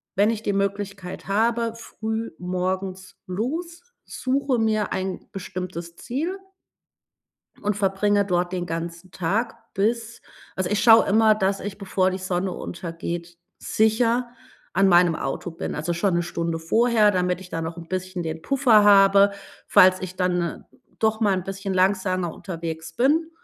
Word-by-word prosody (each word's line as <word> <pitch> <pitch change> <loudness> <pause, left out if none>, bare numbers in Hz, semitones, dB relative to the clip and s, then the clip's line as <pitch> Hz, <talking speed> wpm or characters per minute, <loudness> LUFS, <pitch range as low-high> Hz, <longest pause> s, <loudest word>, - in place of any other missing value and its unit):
wenn 205 +3 +4
ich 220 -1 -2
die 205 - 0
Möglichkeit 200 -1 -3
habe, 230 +3 +1
früh 220 0 -5
morgens 185 +1 -3
los, 320 - -3 0.2
suche 265 -1 -1
mir 215 -2 +1
ein 190 0 -4
bestimmtes 180 -3 -6
Ziel 320 - -3 1.2
und 210 0 0
verbringe 205 +1 +2
dort 180 -2 0
den 180 -1 -2
ganzen 170 +1 -5
Tag 210 +8 -1 0.2
bis 230 +3 -1 0.3
also, 185 -1 -1
ich 210 0 +1
schaue 225 -1 +7
immer, 215 +1 +5
dass 195 -1 0
ich 200 0 -6
bevor 190 -2 +1
die 185 - -3
Sonne 185 0 -2
untergeht 170 0 -6 0.2
sicher 230 +2 +1 0.4
an 195 +2 +3
meinem 175 -2 +5
Auto 140 +5 -4
bin. 165 - -5
Also, 160 +3 -2
schon 175 +1 +1
'ne 175 - +1
Stunde 170 -1 -3
vorher, 220 +4 +3
damit 180 0 0
ich 180 - -11
da 165 - -3
noch 165 +1 -4
'n 165 -1 -9
bisschen 185 -1 -3
den 160 0 -4
Puffer 250 -6 +4
habe, 200 0 +6 0.4
falls 185 0 +6
ich 185 0 -6
dann 180 -2 -1 0.4
doch 220 0 +1
mal 205 -3 +3
'n 185 -2 -2
bisschen 195 0 -4
langsamer 185 -2 +1
unterwegs 165 -3 -6
bin. 315 +6 +2
195 Hz, 150 wpm, -24 LUFS, 180-220 Hz, 1.2 s, schaue